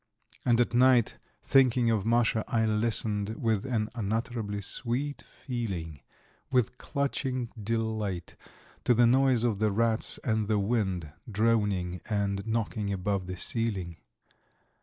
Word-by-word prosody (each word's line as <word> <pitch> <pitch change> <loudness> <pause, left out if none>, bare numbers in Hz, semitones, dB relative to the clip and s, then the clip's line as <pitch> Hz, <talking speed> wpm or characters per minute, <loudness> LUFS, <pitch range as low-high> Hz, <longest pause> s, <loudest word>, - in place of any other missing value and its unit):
And 120 -1 +3
at 120 - +2
night, 125 -1 +4 0.2
thinking 125 -3 +4
of 110 -2 0
Masha, 115 -2 +2
I 110 -1 +1
listened 110 -1 0
with 110 -2 0
an 115 -5 0
unutterably 110 -1 -2
sweet 130 +8 -2
feeling, 95 - -5 0.5
with 125 -1 +1
clutching 130 -3 -2
delight 110 -4 -2 0.5
to 125 - +4
the 120 +1 +5
noise 130 -1 +4
of 110 -5 +1
the 110 -1 +2
rats 115 +2 +1
and 110 -2 0
the 110 -1 +2
wind 95 -7 -1 0.2
droning 100 -5 +1
and 100 -1 -1
knocking 110 -2 -1
above 95 -1 -1
the 90 0 -5
ceiling. 95 -7 -2
110 Hz, 125 wpm, -29 LUFS, 100-120 Hz, 0.5 s, the